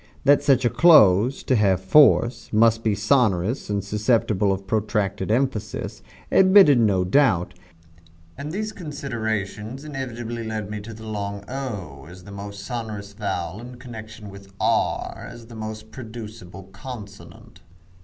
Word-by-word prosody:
That 145 0 +5
such 135 -3 +3
a - - +4
close, 130 - +5
to 130 - +1
have 100 -4 +3
force, 120 +3 +4
must 115 +1 +3
be 110 -2 +1
sonorous 105 -1 +1
and 100 -1 -1
susceptible 105 -1 +1
of 95 0 -3
protracted 105 -1 -1
emphasis, 110 -3 -2 0.3
admitted 190 -8 +6
no 100 -5 +3
doubt, 95 -4 +2 0.8
and 145 +2 -6
these 215 +4 -3
considerations 120 - -5
inevitably 120 -5 -5
led 110 -2 -5
me 105 - -4
to 110 +2 -9
the 110 0 -11
long 100 -2 -5
o 100 - -6
as 90 0 -13
the 100 - -12
most 100 0 -8
sonorous 110 -5 -6
vowel 100 -2 -4
in 125 +1 -10
connection 110 -4 -10
with 100 0 -13
r - - -1
as 115 0 -12
the 115 0 -12
most 110 0 -7
producible 110 -6 -9
consonant. 100 -7 -11
110 Hz, 140 wpm, -23 LUFS, 100-125 Hz, 0.8 s, admitted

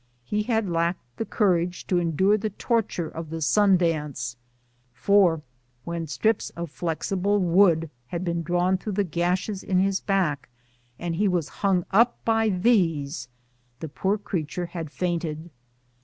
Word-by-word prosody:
He 210 +11 -1
had 220 -1 0
lacked 170 -7 -2
the 225 - -2
courage 180 -5 +1
to 180 - +1
endure 175 +4 +2
the 215 +1 -2
torture 210 -5 -1
of 160 0 -7
the 165 +1 -4
sun 195 +4 +4
dance; 150 -8 -1 0.6
for 170 +2 +3 0.4
when 170 -1 -4
strips 215 +9 0
of 170 -3 -5
flexible 185 +5 -1
wood 175 -3 +4 0.2
had 175 +6 -4
been 170 -1 -1
drawn 175 +3 +1
through 210 +2 -4
the 205 +1 +1
gashes 180 +3 -1
in 185 - 0
his 195 +1 +2
back, 175 -10 0 0.5
and 170 -1 -3
he 205 +2 +2
was 175 -5 0
hung 190 -3 +2
up 230 +4 +4
by 225 -1 +3
these, 170 - +1 0.5
the 160 - -6
poor 195 +7 0
creature 180 -4 -3
had 170 -3 -6
fainted. 170 -1 -3
180 Hz, 150 wpm, -25 LUFS, 165-200 Hz, 0.6 s, sun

